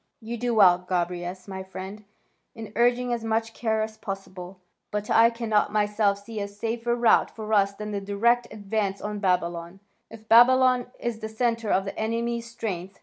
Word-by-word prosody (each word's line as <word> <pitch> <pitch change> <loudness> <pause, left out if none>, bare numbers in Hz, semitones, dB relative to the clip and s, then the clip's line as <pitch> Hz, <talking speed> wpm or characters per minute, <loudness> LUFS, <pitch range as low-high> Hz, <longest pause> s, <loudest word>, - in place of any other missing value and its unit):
"You 230 +1 -6
do 240 0 -1
well, 185 -4 +6
Gobryas, 180 0 -3
my 190 -1 -6
friend, 190 +2 -8 0.5
in 220 -2 -9
urging 245 +1 +2
as 235 -1 -3
much 225 0 -1
care 220 -2 0
as 220 0 -6
possible. 190 -2 -7 0.3
But 210 0 -3
I 230 +1 +6
cannot 230 -3 0
myself 210 -1 +1
see 225 0 -6
a 200 - -3
safer 230 +3 -2
route 235 -1 +4
for 220 -1 -6
us 200 -1 +3
than 210 +1 -6
the 200 -1 -3
direct 230 +5 +1
advance 205 -1 -2
on 210 0 -4
Babylon, 175 -1 -1 0.3
if 220 -1 -13
Babylon 250 +1 +5
is 235 -2 -3
the 220 -1 -5
centre 230 -1 -1
of 195 0 +2
the 195 - -5
enemy's 230 +1 -2
strength. 195 -5 -5
215 Hz, 175 wpm, -26 LUFS, 195-230 Hz, 0.5 s, well